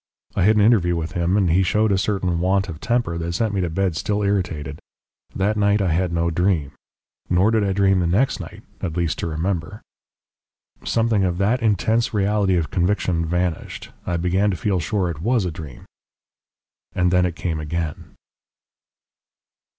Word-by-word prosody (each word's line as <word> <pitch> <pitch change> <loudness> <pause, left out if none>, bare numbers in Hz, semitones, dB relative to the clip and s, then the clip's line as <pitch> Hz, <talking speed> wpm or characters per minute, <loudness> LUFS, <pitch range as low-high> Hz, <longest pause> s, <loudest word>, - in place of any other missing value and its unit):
I - - 0
had 110 +2 +5
an 105 - +4
interview 100 -6 +3
with 80 -1 -3
him, 90 +3 0
and 95 -5 +2
he 90 +3 +4
showed 105 +3 +2
a 95 - +3
certain 95 -4 -1
want 95 +2 +1
of 80 -4 -7
temper 120 -9 -1
that 85 +1 -3
sent 110 +3 0
me 95 - 0
to 90 - -1
bed 90 0 -1
still 105 +5 -1
irritated. 80 -8 -2 0.6
That 105 +3 0
night 100 0 +3
I 95 -4 +1
had 90 +1 0
no 85 0 0
dream. 85 -4 0 0.6
Nor 90 +5 +3
did 110 -2 +2
I 100 - 0
dream 95 -1 +3
the 90 - +1
next 105 +11 +1
night, - - -9 0.2
at 85 -1 -3
least, 85 -3 -1
to - - -2
remember. 85 +4 -3 1.0
"Something 115 -3 +1
of 90 -2 0
that 110 +6 +1
intense 110 +2 +1
reality 100 -1 +2
of 80 -2 -2
conviction 90 -2 0
vanished. 90 -1 -3
I 85 - -2
began 90 +4 +1
to 95 - -2
feel 95 +1 0
sure 90 +4 -1
it 80 -1 -8
WAS 115 0 +1
a 90 - -2
dream. 75 -5 -10 1.1
And 90 -1 +1
then 90 0 +3
it 85 - -5
came 85 -2 -3
again. 75 0 -5
90 Hz, 180 wpm, -22 LUFS, 85-100 Hz, 1.1 s, had